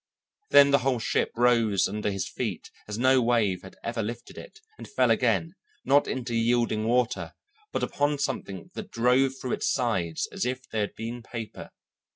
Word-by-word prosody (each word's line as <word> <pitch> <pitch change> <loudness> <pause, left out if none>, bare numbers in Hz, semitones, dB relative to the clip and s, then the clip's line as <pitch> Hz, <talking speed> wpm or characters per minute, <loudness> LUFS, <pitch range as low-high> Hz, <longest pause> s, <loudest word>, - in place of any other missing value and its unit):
Then 140 0 +7
the 140 - +5
whole 130 0 +1
ship 110 - 0
rose 115 -5 +3
under 105 +1 -2
his 95 -2 -3
feet - - -5 0.2
as 105 0 -5
no 130 +2 +4
wave 115 -6 +1
had 95 - -12
ever 115 0 -2
lifted 115 +3 -6
it, 460 -3 -11 0.2
and - - -8
fell - - +2
again, - - +1 0.3
not 140 +1 +4
into 125 -2 -3
yielding 115 -1 +1
water, 125 0 0 0.4
but - - -2
upon 145 +1 0
something 130 -10 -4
that - - -7
drove 125 +3 +3
through 125 - -4
its - - 0
sides 95 -11 -1
as - - -3
if 130 +1 -3
they 110 - -3
had 105 - -2
been 115 +2 -5
paper. 115 -1 -8
120 Hz, 180 wpm, -27 LUFS, 110-130 Hz, 0.4 s, Then